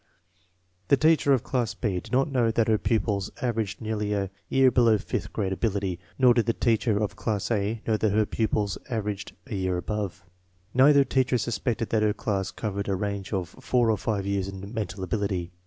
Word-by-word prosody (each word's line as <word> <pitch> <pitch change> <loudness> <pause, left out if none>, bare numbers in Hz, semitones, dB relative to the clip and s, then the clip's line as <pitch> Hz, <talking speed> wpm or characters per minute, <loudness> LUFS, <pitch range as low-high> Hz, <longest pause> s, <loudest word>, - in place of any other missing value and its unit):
The 140 - +5
teacher 155 -1 +4
of 130 -4 +3
class 120 -5 -1
B 105 -5 -1
did - - -13
not 135 +1 +3
know 120 -4 +2
that 115 0 +1
her 110 -2 +3
pupils 105 -3 0
averaged 115 -5 -2
nearly 105 -2 -2
a 100 -2 -1 0.2
year 135 -1 +5
below 115 -3 +4
fifth - - -4
grade 95 -2 -1
ability, 95 -4 -1 0.2
nor 125 -2 +6
did 120 -1 +1
the 115 - +3
teacher 115 -2 +1
of 105 -1 -1
class 105 0 -2
A 105 +1 -1
know 110 -1 +2
that 110 -1 +1
her 105 +1 +3
pupils 105 -2 -1
averaged 105 -4 -3
a 135 - -7
year 95 -2 0
above. 100 0 -4 0.5
Neither 140 +2 +6
teacher 130 -2 +1
suspected 115 0 -2
that 110 - +2
her 105 -1 +2
class 100 -2 -2
covered 100 -2 -4
a 95 - +1
range 100 0 -3
of 95 -4 -2
four 125 -3 +1
or 110 - +1
five 100 -2 -2
years 100 -1 -1
in 100 +2 -8
mental 100 -4 -4
ability. 95 -2 -2
105 Hz, 195 wpm, -26 LUFS, 100-115 Hz, 0.5 s, nor